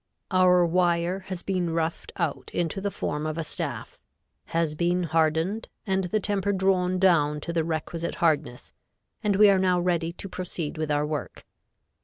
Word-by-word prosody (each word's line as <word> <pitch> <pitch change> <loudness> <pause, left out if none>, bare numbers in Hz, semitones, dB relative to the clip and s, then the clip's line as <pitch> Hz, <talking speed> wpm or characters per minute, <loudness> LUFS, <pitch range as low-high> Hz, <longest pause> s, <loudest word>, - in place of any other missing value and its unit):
Our 180 -1 +5
wire 175 +1 +1
has 185 -2 -5
been 180 -3 -1
roughed 165 0 -2
out 170 -6 -2
into 175 +3 -1
the 200 - -1
form 150 -5 -3
of 155 +1 -3
a 165 - -1
staff, - - -4 0.5
has 165 -2 0
been 175 +3 +1
hardened 165 +6 0 0.2
and 190 -2 0
the 215 +4 0
temper 200 -1 0
drawn 185 -1 +2
down 160 -6 +3
to 170 - -4
the 165 -1 +1
requisite 165 +1 -3
hardness 150 -6 0 0.5
and 205 -2 +2
we 210 +2 +7
are 195 - +3
now 185 -1 +2
ready 170 -2 0
to 180 - -8
proceed 180 -4 -4
with 155 -1 -2
our 145 0 +1
work. 150 -2 -5
175 Hz, 170 wpm, -26 LUFS, 160-185 Hz, 0.5 s, we